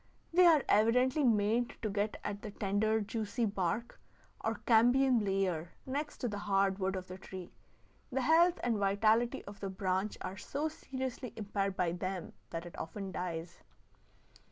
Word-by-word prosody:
They 360 +1 +7
are 310 -5 +6
evidently 250 +7 +4
made 230 0 +2
to 215 - 0
get 205 +1 -1
at 205 0 -4
the 215 - -6
tender, 210 +2 +1
juicy 215 +2 -2
bark, 200 +3 -2 0.4
or 225 0 0
cambium 245 +1 +5
layer, 185 -4 -1
next 290 +3 -3
to 245 - 0
the 205 -2 -3
hard 195 -1 +1
wood 190 0 0
of 185 -1 -4
the 185 +1 -8
tree. 185 -2 -8 0.6
The 265 +1 0
health 335 +6 +4
and 235 -3 +1
vitality 215 +4 +2
of 200 0 -10
the 195 - -3
branch 190 +1 -1
are 185 +1 -5
so 295 +9 -2
seriously 260 -5 -5
impaired 200 -2 -2
by 175 -2 +1
them 185 0 -4 0.2
that 165 +1 -5
it 175 - -9
often 195 +3 -5
dies. 170 -2 -5
205 Hz, 160 wpm, -33 LUFS, 190-245 Hz, 0.6 s, They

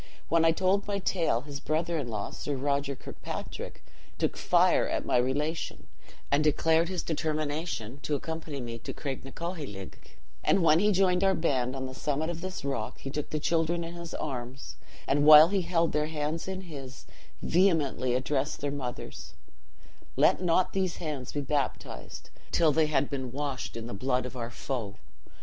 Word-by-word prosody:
When 165 -1 +4
I 165 - +6
told 190 +4 +1
my 200 -1 0
tale, 175 -10 +1
his 145 0 -7
brother 165 +3 -1
in 135 - -3
law, 105 -3 -3
Sir 145 - -3
Roger 140 +1 0
Kirkpatrick, - - -7 0.3
took - - 0
fire - - +3
at - - -1
my - - +3
relation, 145 +6 -1 0.5
and 145 +2 +4
declared 160 +2 +3
his 185 -2 -2
determination 155 -5 -2
to 150 - -1
accompany 160 -1 -4
me 115 -1 -5
to - - -7
Craignacoheilg; 135 - -5 0.5
and 190 - +3
when 160 0 +6
he 210 +2 +4
joined 185 -1 +3
our 195 -1 +4
band 130 -5 0
on 130 0 -3
the 130 - -6
summit 150 +4 -1
of 170 -1 -6
this 185 -5 -5
rock, 135 -6 -2
he 135 - -6
took 150 0 -3
the 155 - -1
children 165 +2 +1
in 165 +1 -6
his 170 -1 -7
arms, 130 -2 -5 0.3
and 145 +1 +3
while 155 +2 +10
he 195 -1 +1
held 170 -1 +1
their 150 0 +1
hands 155 +2 -2
in 190 0 -3
his, 135 -7 -9 0.4
vehemently 155 -9 +2
addressed 135 +2 -1
their 145 0 -2
mothers, 130 -4 -6 0.8
'Let - - +4
not 180 0 +2
these 190 -3 0
hands 145 -6 -4
be 145 - -2
baptized, 140 -1 -3 0.2
till 165 -2 +4
they 155 +1 +3
had 145 -2 +2
been 130 -3 -4
washed 140 -3 -3
in 115 - -5
the 120 - -6
blood 125 +4 0
of 125 - -7
our 120 -2 -4
foe. 120 -4 -4
150 Hz, 175 wpm, -29 LUFS, 135-165 Hz, 0.8 s, while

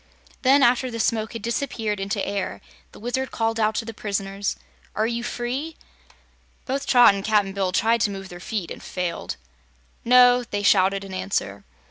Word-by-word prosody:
Then, 270 +2 +5
after 255 +1 +3
the 230 -1 -6
smoke 220 0 0
had 230 -3 -7
disappeared 230 -3 -2
into 195 +1 -2
air, 200 -1 -3 0.3
the - - -14
Wizard 255 +3 -2
called 225 0 -1
out 215 0 +2
to 225 - -2
the 230 - -6
prisoners: 200 -1 -3 0.4
"Are 215 - +1
you 235 +1 -2
free?" 250 +6 -4 0.9
Both 275 +1 -3
Trot 245 -5 +7
and 195 0 -4
Cap'n 205 -2 +2
Bill 190 -2 -1
tried 225 +4 +2
to 210 - +2
move 195 -1 -7
their 175 - -9
feet 185 -2 -4
and - - -7
failed. 180 - -4 0.7
"No!" 245 0 +6
they 205 -3 -4
shouted 195 0 +3
in 195 -1 -9
answer. 185 - -3
215 Hz, 175 wpm, -23 LUFS, 195-240 Hz, 0.9 s, Trot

